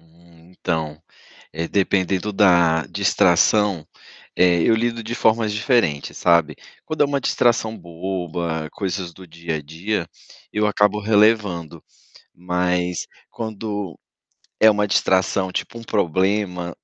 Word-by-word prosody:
Hum, 85 +1 -22
então, 80 -4 -4 0.7
dependendo 95 0 0
da 85 -5 +4
distração, 100 -7 +2 0.5
eh, 90 -2 +4
eu 115 - +4
lido 115 +1 -1
de 115 +1 -4
formas 110 -2 +2
diferentes, 105 - 0
sabe, 85 -3 +2 0.3
quando 155 -1 -1
é - - +4
uma 140 0 -1
distração 115 -3 +1
boba, 85 -2 -4
coisas 95 -2 -4
do 95 +2 -13
dia 85 0 -5
a 75 - -6
dia, 85 +4 -3 0.4
eu 105 0 +1
acabo 105 0 +2
relevando. 105 -6 +1 0.5
Mas 90 0 -1 0.2
quando 105 -4 -5 0.6
é 110 - +8
uma 105 0 0
distração, 95 -1 +1
tipo, 115 - -4
um 115 - -10
problema, 95 -2 -1
95 Hz, 120 wpm, -21 LUFS, 85-105 Hz, 0.7 s, é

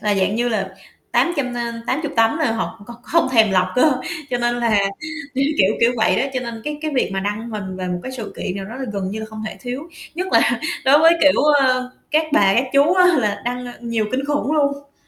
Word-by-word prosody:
là 210 -1 +1
dạng 195 +1 +1
như 240 +1 +1
là 200 -4 -1 0.4
800, 285 -8 +1
a, 235 -1 -3
80 295 +3 -2
tấm 225 +4 +3
là 295 -8 +1
họ 225 -1 -4
còn 235 0 -10
không 335 +3 +1
thèm 220 -4 +5
lọc 185 -1 +2
cơ. 295 +4 +4 0.4
Cho 245 - 0
nên 240 0 0
là 230 -3 +2 0.6
kiểu 270 +1 +1
kiểu 190 +3 +4
kiểu 235 +1 +4
vậy 220 - +2
đó, - - +2
cho 255 - 0
nên 235 -2 -6
cái 300 0 -4
cái 310 - -2
việc 255 - +1
mà 195 - -1
đăng 210 +4 -4
hình 190 -4 -5
về 185 -1 -4
một 180 0 -3
cái 260 - -6
sự 230 -5 -7
kiện 185 - -4
nào 195 - -5
đó 215 +4 -9
là 265 - -4
gần 195 -2 -3
như 215 +2 -5
là 220 - -6
không 215 0 -8
thể - - -6
thiếu, 250 +2 -5 0.3
nhất 365 +3 -3
là - - +3 0.2
đối 275 +2 +6
với, 325 +2 +6
kiểu, 290 -2 +5
ơ, 260 -4 +3 0.2
các 310 +1 +2
bà, 195 -9 +4
các 245 - +3
chú 285 +5 +4
á 365 -1 +5
là 210 -4 -1
đăng, 250 +1 -3
ờ, 245 - -7
nhiều 230 -2 -1
kinh 270 +2 -1
khủng 290 0 -1
luôn. 280 -1 -1
240 Hz, 250 wpm, -20 LUFS, 215-280 Hz, 0.6 s, đối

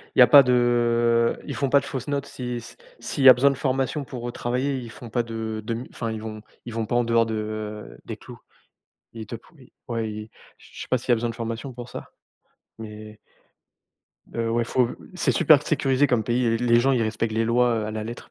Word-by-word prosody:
il - - +1
y - - +10
a 125 - +9
pas 140 -2 +9
de 120 -1 +2
ils - - -4
font 140 -2 -1
pas 140 - +5
de 140 - -8
fausses 130 -2 -5
notes, 140 -1 -2
si 125 -1 -5
s 120 - -10 0.2
s'il 140 - -3
y 135 - +11
a - - +11
besoin 135 +4 +4
de 135 - -1
formation 135 +2 -1
pour 120 -2 -6
travailler, 130 +3 -2
ils 120 -3 -7
font 120 - -10
pas 120 +1 0
de 110 -1 -5
de 115 - -2
m 120 +3 -5
enfin 115 -1 -4
ils 110 -1 -5
vont 110 -1 -7 0.2
ils 120 - -7
vont 115 -1 -2
pas 120 - -2
en 120 - +3
dehors 115 0 +3
de 110 -1 -5
des - - -5
clous. - - -12 0.8
Il 110 -1 -7
te 115 - -7
pou 125 +9 -16
ils 130 - -18 0.2
ouais 115 -2 -2
ils 105 +1 -8 0.3
j - - -18
je - - -8
sais - - -11
pas 130 - +2
s'il 125 - -11
y - - +6
a - - +4
besoin 115 +1 -2
de - - -12
formation 115 +2 -5
pour 120 0 -9
ça, - - -9 0.7
mais 105 -1 -9 1.2
Heu, 115 -1 -1
ouais, 120 +1 +1
faut 120 +1 +1 0.3
c'est 180 - +1
super 150 -2 +5
sécurisé 140 -2 +2
comme 120 -4 +1
pays, 120 +1 0
l 115 - +2
les 120 0 +5
gens, 135 +2 +2
ils 120 -3 +2
respectent 110 0 -2
les 115 +1 +1
lois, 120 +1 +3
heu, - - -3
à 110 - -4
la 110 0 -4
lettre. 120 +2 -8
120 Hz, 250 wpm, -24 LUFS, 110-125 Hz, 1.2 s, y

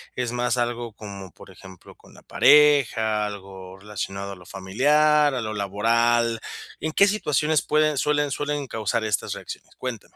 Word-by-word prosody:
Es 125 -1 -2
más 125 0 -1
algo 120 -2 -2
como, 100 -3 -10
por 95 - -15
ejemplo, 95 -1 -15
con - - -20
la - - -16
pareja, 120 -8 +4
algo 95 -2 -9
relacionado 100 -1 -6
a - - -10
lo 90 -1 -16
familiar, 150 +11 +2
a 125 - -2
lo 110 -1 -4
laboral, 115 +3 +1 0.4
¿en 155 - -3
qué 200 - +5
situaciones 155 -6 +1
pueden 155 -1 +1
suelen 145 0 +1
suelen 145 -1 -3
causar 110 0 -2
estas 105 -3 -2
reacciones? - - -10
Cuéntame. - - -7
115 Hz, 160 wpm, -24 LUFS, 100-145 Hz, 0.4 s, qué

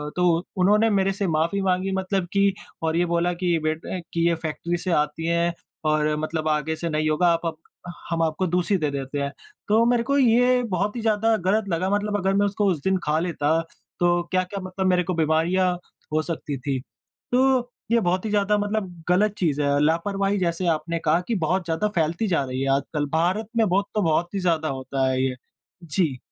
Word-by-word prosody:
तो 175 -1 +2
उन्होंने 210 +4 +4
मेरे 195 -1 +2
से 200 -1 -2
माफी 165 +5 0
माँगी 190 0 0
मतलब 190 -1 -1
कि 200 -1 +3 0.3
और 160 0 0
ये 175 - +3
बोला 170 +1 +1
कि 175 -1 0
बेट 155 +1 -1 0.3
कि 170 0 +2
ये 170 - +2
फैक्ट्री 170 +3 -2
से 180 +1 -3
आती 150 +1 0
है 170 0 +1 0.3
और 155 0 +2
मतलब 155 0 -2
आगे 155 +1 0
से 170 +1 -4
नहीं 155 0 0
होगा, 175 +3 +2
आप 170 0 +2
अब 160 -1 -2 0.5
हम 165 -1 0
आपको 165 +4 0
दूसरी 180 +3 +1
दे 150 -3 -1
देते 140 +1 -4
हैं, 140 0 -2 0.4
तो 220 +3 +4
मेरे 240 -1 +2
को 280 +2 +1
ये 250 0 +4
बहुत 200 +5 -1
ही 235 - -3
ज़्यादा 220 0 +2
गलत 200 +3 0
लगा 185 +3 0
मतलब 205 0 0
अगर 195 0 0
मैं 200 +1 +3
उसको 205 +1 0
उस 155 -5 -3
दिन 190 0 +2
खा 150 +1 +1
लेता 165 -2 0 0.4
तो 175 0 +3
क्या-क्या 185 +2 -1
मतलब 185 0 -2
मेरे 180 -1 +3
को 185 +1 -2
बीमारियाँ 165 +3 +2 0.4
हो 155 - +3
सकती 155 -4 -4
थी, 130 0 -2 0.5
तो 255 -1 +2 0.2
ये 235 - +5
बहुत 185 0 0
ही - - -1
ज़्यादा 205 0 +2
मतलब 205 -5 -3
गलत 200 +3 +3
चीज़ 150 -5 0
है, 145 0 +2
लापरवाही 195 +5 +1
जैसे 175 0 -1
आपने 165 +1 0
कहा 165 +3 +3
कि 230 - 0
बहुत 185 +2 0
ज़्यादा 170 +6 0
फैलती 170 +6 0
जा 165 -7 +1
रही 130 +1 -4
है 135 - 0
आजकल, 145 +2 -2
भारत 185 +7 +1
में 225 - +4
बहुत 200 +2 +2
तो 210 - +2
बहुत 170 +2 +1
ही 195 - -1
ज़्यादा 165 -3 +1
होता 135 -1 -1
है 130 0 0
ये, 130 -1 0 0.5
जी। 155 -4 0
175 Hz, 210 wpm, -24 LUFS, 160-200 Hz, 0.5 s, ये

